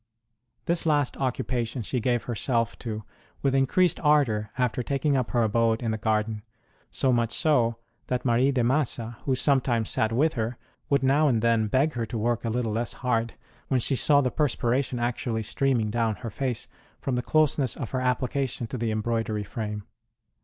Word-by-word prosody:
This 170 Hz, -1 st, 0 dB
last 145 Hz, -4 st, +2 dB
occupation 125 Hz, -2 st, -2 dB
she 125 Hz, +4 st, -1 dB
gave 120 Hz, -1 st, 0 dB
herself 115 Hz, 0 st, -1 dB
to 110 Hz, -2 st, -5 dB, 0.4 s
with 135 Hz, -1 st, +2 dB
increased 135 Hz, +7 st, +3 dB
ardour 130 Hz, -9 st, +2 dB
after 125 Hz, -1 st, 0 dB
taking 140 Hz, +3 st, 0 dB
up 130 Hz, -3 st, 0 dB
her 120 Hz, -1 st, +2 dB
abode 115 Hz, +1 st, +2 dB
in 115 Hz, -, 0 dB
the 110 Hz, -, -1 dB
garden; 110 Hz, 0 st, 0 dB, 0.5 s
so 130 Hz, -2 st, +1 dB
much 115 Hz, -1 st, +1 dB
so, 120 Hz, -6 st, +2 dB, 0.3 s
that 125 Hz, 0 st, -2 dB
Marie 125 Hz, +3 st, +3 dB
de 130 Hz, -3 st, +1 dB
Massa, 120 Hz, -3 st, 0 dB
who 135 Hz, -, +2 dB
some 135 Hz, +1 st, +3 dB
times 115 Hz, -4 st, 0 dB
sat 110 Hz, -, +1 dB
with 150 Hz, +7 st, +2 dB
her, 115 Hz, +1 st, -2 dB, 0.3 s
would 140 Hz, -1 st, +2 dB
now 145 Hz, +3 st, +4 dB
and 115 Hz, -5 st, +1 dB
then 115 Hz, -2 st, +3 dB
beg 135 Hz, +8 st, +2 dB
her 115 Hz, -2 st, -3 dB
to 120 Hz, -, -4 dB
work 115 Hz, +1 st, 0 dB
a 115 Hz, -, -1 dB
little 115 Hz, -1 st, -1 dB
less 115 Hz, +2 st, -1 dB
hard, 115 Hz, -2 st, 0 dB, 0.3 s
when 130 Hz, -, +2 dB
she 135 Hz, +3 st, +1 dB
saw 145 Hz, +2 st, +4 dB
the 130 Hz, -2 st, 0 dB
perspiration 130 Hz, -3 st, 0 dB
actually 120 Hz, -1 st, -1 dB
streaming 120 Hz, -2 st, 0 dB
down 115 Hz, -1 st, 0 dB
her 115 Hz, +4 st, -7 dB
face 125 Hz, 0 st, -3 dB, 0.3 s
from 135 Hz, -, -2 dB
the 125 Hz, -, +1 dB
closeness 145 Hz, -3 st, +2 dB
of 120 Hz, -, -5 dB
her 130 Hz, -, -1 dB
application 130 Hz, 0 st, -1 dB
to 125 Hz, +2 st, -5 dB
the 115 Hz, -1 st, -1 dB
embroidery 110 Hz, -1 st, -1 dB
frame. 105 Hz, 0 st, -5 dB
120 Hz, 185 wpm, -26 LUFS, 115-135 Hz, 0.5 s, now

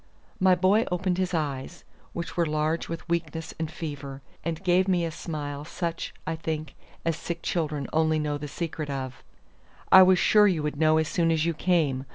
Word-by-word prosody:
My 185 Hz, -1 st, +5 dB
boy 195 Hz, +5 st, +3 dB
opened 180 Hz, 0 st, 0 dB
his 185 Hz, -1 st, 0 dB
eyes, 150 Hz, 0 st, -3 dB, 0.3 s
which 170 Hz, -1 st, -5 dB
were 170 Hz, -2 st, +2 dB
large 155 Hz, +2 st, -1 dB
with 165 Hz, 0 st, -6 dB
weakness 165 Hz, -1 st, -2 dB
and 160 Hz, -1 st, -2 dB
fever, 140 Hz, -4 st, -7 dB, 0.2 s
and 165 Hz, +1 st, -3 dB
gave 185 Hz, +1 st, +3 dB
me 180 Hz, -3 st, +2 dB
a 165 Hz, -, -3 dB
smile 145 Hz, -3 st, -5 dB
such, 170 Hz, +2 st, -4 dB
I 165 Hz, -, -2 dB
think, 155 Hz, -2 st, -4 dB, 0.3 s
as 165 Hz, -1 st, +1 dB
sick 170 Hz, +1 st, -5 dB
children 150 Hz, -4 st, -1 dB
only 160 Hz, 0 st, +3 dB
know 150 Hz, -1 st, -1 dB
the 150 Hz, -, -5 dB
secret 155 Hz, 0 st, -4 dB
of. 130 Hz, -2 st, -5 dB, 0.7 s
"I 190 Hz, -, +10 dB
was 185 Hz, 0 st, +6 dB
sure 210 Hz, +3 st, +5 dB
you 170 Hz, -6 st, +1 dB
would 150 Hz, -1 st, -2 dB
know 155 Hz, 0 st, +4 dB
as 160 Hz, -1 st, +1 dB
soon 165 Hz, +1 st, +1 dB
as 160 Hz, -1 st, +2 dB
you 170 Hz, -, +1 dB
came. 155 Hz, -6 st, +1 dB
160 Hz, 195 wpm, -27 LUFS, 150-175 Hz, 0.7 s, I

